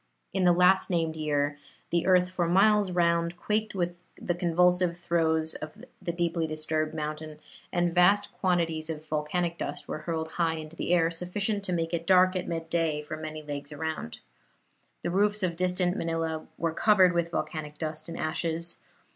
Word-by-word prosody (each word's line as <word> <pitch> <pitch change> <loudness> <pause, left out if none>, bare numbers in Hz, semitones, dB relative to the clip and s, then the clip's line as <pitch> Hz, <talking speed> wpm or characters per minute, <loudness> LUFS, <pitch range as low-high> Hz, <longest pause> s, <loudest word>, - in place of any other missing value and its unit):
In 190 -1 +1
the 175 - +7
last 180 +2 +4
named 165 -3 0
year 145 -2 -1 0.3
the 170 +1 +1
earth 180 -1 +5
for 175 -2 0
miles 200 +3 +4
round 170 -1 +1
quaked 215 +3 -1
with 175 -1 -1 0.2
the 175 - -1
convulsive 180 0 +2
throes 160 -2 +1
of 155 0 -9 0.2
the 170 - -2
deeply 170 -1 -1
disturbed 155 0 -2
mountain, 155 0 -5 0.3
and 175 -1 +1
vast 195 +4 +4
quantities 165 -4 0
of 155 -1 -5
volcanic 165 +3 -1
dust - - -5
were - - -4
hurled 160 0 -3
high 165 -1 0
into 155 0 -8
the 170 - -3
air, 165 -2 +3
sufficient 200 +5 -2
to 185 - -2
make 165 -1 -1
it 170 0 -2
dark 185 0 +5
at 185 - -2
midday 165 -2 -1
for 150 - -6
many 155 0 -6
leagues 145 -1 -6
around. 155 - -4 0.9
The 175 - -1
roofs 205 +2 +2
of 175 -2 0
distant 180 0 +1
Manila 165 -1 -2
were 165 -1 -1
covered 190 -1 +5
with 170 -1 0
volcanic 155 -3 -4
dust 155 +1 -5
and 165 - -6
ashes. 165 +1 -1
170 Hz, 170 wpm, -28 LUFS, 160-180 Hz, 0.9 s, the